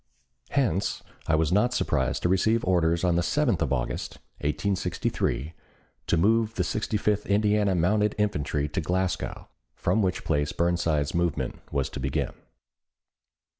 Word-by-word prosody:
Hence 110 - 0 0.2
I 80 - +3
was 80 +1 +1
not 115 +6 +3
surprised 65 -4 0
to - - +3
receive 110 +5 +2
orders 85 -2 +2
on 90 -2 +3
the - - +3
7th 120 - +1
of 75 -5 0
August, 60 -3 -2 0.2
1863, 75 -2 -1 0.5
to - - +2
move 110 +5 +2
the 90 - +1
Sixty 105 +4 -1
fifth 105 0 0
Indiana 105 -1 +2
Mounted 105 +5 +2
Infantry 75 -8 0
to 90 - -2
Glasgow, 90 +2 -2 0.3
from 110 - +1
which 95 -2 0
place 75 0 0
Burnside's 85 -4 +1
movement 85 -3 -1
was 70 -1 0
to - - -5
begin. 65 +1 -1
90 Hz, 140 wpm, -27 LUFS, 75-105 Hz, 0.5 s, I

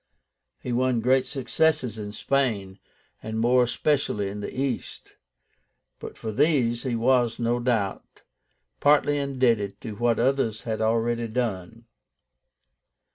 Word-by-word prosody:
He 125 - -4
won 125 0 +1
great 130 +3 +2
successes 135 -3 0
in 105 -1 -5
Spain, 105 -7 -1 0.4
and 110 0 -4
more 125 +2 +4
especially 125 -4 0
in 105 +1 -6
the 105 - -5
East; 130 -2 -4 0.8
but - - -9
for 110 - -5
these 125 -3 +2
he 125 -2 -2
was, 120 0 +2
no 120 0 0
doubt, 115 -5 -2 0.6
partly 145 0 +3
indebted 120 -8 0
to 110 - -6
what 120 +2 +1
others 120 -3 0
had 110 -1 -3
already 115 +1 0
done. 115 -2 -4
120 Hz, 125 wpm, -25 LUFS, 110-130 Hz, 0.8 s, more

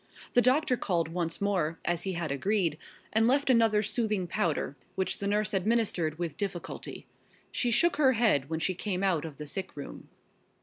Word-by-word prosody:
The 245 - +6
doctor 255 +2 +3
called 170 -6 0
once 165 -1 -2
more, 180 -6 0
as 175 -1 0
he 190 - -3
had 170 -4 -3
agreed, 170 +1 0 0.3
and 220 +1 +4
left 270 +1 +3
another 225 -3 +4
soothing 210 -3 0
powder, 160 -4 -1 0.2
which 190 -1 -1
the 200 - -2
nurse 210 +1 +1
administered 195 -6 +1
with 165 -4 -4
difficulty. 190 -4 -5 0.5
She 245 - 0
shook 340 +9 +3
her 265 -3 +5
head 210 - +2
when 160 0 -2
she 185 - +1
came 185 0 -2
out 175 -5 +1
of 150 -4 -8
the 150 - -6
sick 190 +2 -5
room. 140 - -8
190 Hz, 180 wpm, -29 LUFS, 165-220 Hz, 0.5 s, The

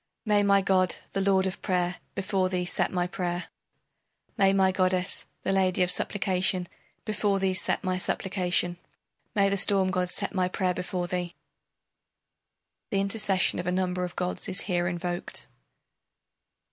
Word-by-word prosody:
May 210 -1 +3
my 200 -1 +4
god, 185 -2 +3 0.2
the 195 - 0
lord 190 -1 +3
of 190 - -4
prayer, 180 -2 0 0.2
before 190 -1 0
thee 180 -1 -1
set 180 - 0
my 180 -1 0
prayer! 175 -1 -3 0.9
May 195 -1 +4
my 190 -1 +3
goddess, 185 0 0 0.2
the - - 0
lady 185 -1 +2
of 180 - +2
supplication, 185 -2 0 0.4
before 210 -2 +1
thee 190 -1 +1
set 185 - -1
my 185 -1 -1
supplication! 180 -2 -1 0.6
May 200 -1 +4
the 200 0 +1
storm 190 -1 +4
god 180 -2 0
set 195 +2 -1
my 185 -2 +1
prayer 185 0 0
before 180 0 -3
thee! 175 -1 -3 1.5
[The 195 - 0
intercession 195 -2 +2
of 175 - -4
a - - +2
number 180 0 0
of 180 -1 -5
gods 180 +1 -3
is 190 - +1
here 175 -2 0
invoked. 175 0 -4
185 Hz, 155 wpm, -27 LUFS, 180-195 Hz, 1.5 s, my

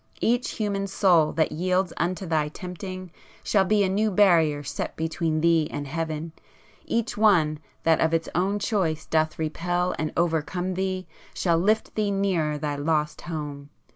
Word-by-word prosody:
Each 240 +2 +1
human 200 -2 -2
soul 180 -5 +3
that 160 0 +1
yields 185 +2 0
unto 180 +3 -2
thy 155 -3 +1
tempting 185 +2 -7 0.3
shall 195 -2 +3
be 210 +1 +3
a - - +2
new 210 +3 +1
barrier 170 -7 +4
set - - -4
between 160 0 -1
thee 165 -2 +3
and 145 - -4
heaven; 160 +2 -3 0.5
each 235 +1 -1
one 170 -8 +4 0.2
that 165 -1 +3
of 160 - +3
its 165 0 0
own 190 +4 +1
choice 185 -7 -1
doth 155 -1 0
repel 175 +3 -1
and 155 -1 -1
overcome 175 +2 0
thee, 185 0 -2 0.3
shall 170 -2 +2
lift 215 +5 +1
thee 210 -1 0
nearer 185 -7 0
thy 145 -1 -3
lost 150 0 0
home! 145 -4 -6
170 Hz, 160 wpm, -25 LUFS, 155-190 Hz, 0.5 s, barrier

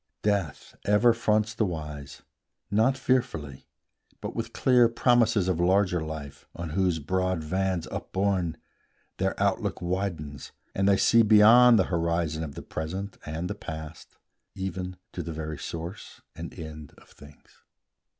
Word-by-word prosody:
Death 100 -8 -1
ever 105 +4 +4
fronts 110 -1 +1
the 110 - 0
wise; 75 -6 -5 0.5
Not 115 +6 +3
fearfully, 80 - -1 0.5
but - - -6
with - - -3
clear 125 -3 +4
promises 115 -4 +3
Of 90 -3 0
larger 90 -1 +2
life, 80 -3 -8
on 85 -2 -5
whose 90 0 +1
broad 95 +2 -1
vans 95 +1 -1
upborne, 95 -4 -1 0.6
Their - - -1
out - - +2
look - - -3
widens, 85 -6 -4 0.2
and 95 +1 +2
they 100 - +5
see 115 - +5
beyond 115 +3 +7
The 95 - +4
horizon 85 -1 0
of 70 -3 -7
the - - -7
Present 95 +6 -5
and 80 +3 -3
the 105 - -3
Past, 80 -6 -9 0.4
Even 95 -1 -4
to 90 - -5
the 85 0 -5
very 75 -1 -5
source 85 +8 -7
and 85 0 -7
end 80 -3 -8
of - - -20
things. 75 0 -18
90 Hz, 145 wpm, -27 LUFS, 80-105 Hz, 0.6 s, beyond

